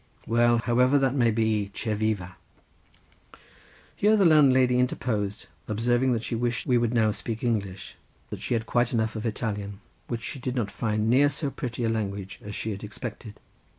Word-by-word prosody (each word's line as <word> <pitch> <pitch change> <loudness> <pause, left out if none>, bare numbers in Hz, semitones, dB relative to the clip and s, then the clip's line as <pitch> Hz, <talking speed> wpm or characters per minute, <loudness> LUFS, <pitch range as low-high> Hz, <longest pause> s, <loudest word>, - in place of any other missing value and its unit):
Well, 120 +1 +3
however 125 +4 +3
that 135 -2 +2
may 120 -4 +3
be, 110 -2 0
che 110 - -2
viva." 105 -4 -2 1.6
Here 215 +2 +4
the 195 - +4
landlady 130 -6 +5
interposed, 105 -5 -1 0.2
observing 120 +4 +1
that 115 -1 -2
she - - -4
wished 120 +1 -1
we 125 - +2
would 120 -1 +1
now 110 -3 +3
speak 115 +2 -5
English, 100 -6 -3 0.3
for - - -5
that - - -14
she 120 - -1
had 115 -1 -2
quite 120 +1 +1
enough 110 -1 0
of 110 +1 -3
Italian, 105 -3 -4 0.3
which 120 -1 -4
she 135 - -5
did 125 0 -3
not 110 -6 -1
find 110 -1 -1
near 135 +5 +5
so 145 0 -2
pretty 120 -2 -4
a 115 - +1
language 100 -3 -3
as 105 0 -7
she 110 - -3
had 100 0 -6
expected. 105 0 -8
115 Hz, 185 wpm, -26 LUFS, 105-125 Hz, 1.6 s, landlady